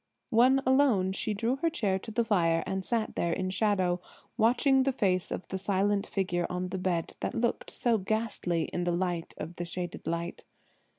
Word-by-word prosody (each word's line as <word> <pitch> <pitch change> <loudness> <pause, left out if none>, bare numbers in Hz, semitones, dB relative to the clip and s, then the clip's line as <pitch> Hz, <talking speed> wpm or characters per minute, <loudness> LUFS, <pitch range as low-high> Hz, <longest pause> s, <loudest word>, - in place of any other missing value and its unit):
When 255 +4 +5
alone 260 -8 +3
she 210 +2 -2
drew 235 +6 0
her 330 +4 +1
chair 195 -10 0
to 210 - -9
the 235 +2 +1
fire 165 -7 +2
and 190 0 -2
sat 230 +1 -1
there 170 - 0
in 185 +1 -2
shadow, 185 -3 +1 0.4
watching 250 +4 +4
the 270 +1 +2
face 190 -8 0
of - - -5
the 190 - -3
silent 200 +1 +1
figure 175 -3 -1
on 180 0 -3
the 190 - -3
bed 175 -3 -1
that - - -3
looked 235 0 -1
so 235 -3 +2
ghastly 195 -5 -1
in 175 - -1
the 175 - +1
light 175 -1 -2
of 165 +3 -7
the 175 - -3
shaded 175 +1 -5
light. 170 +1 -3
190 Hz, 190 wpm, -29 LUFS, 180-230 Hz, 0.4 s, When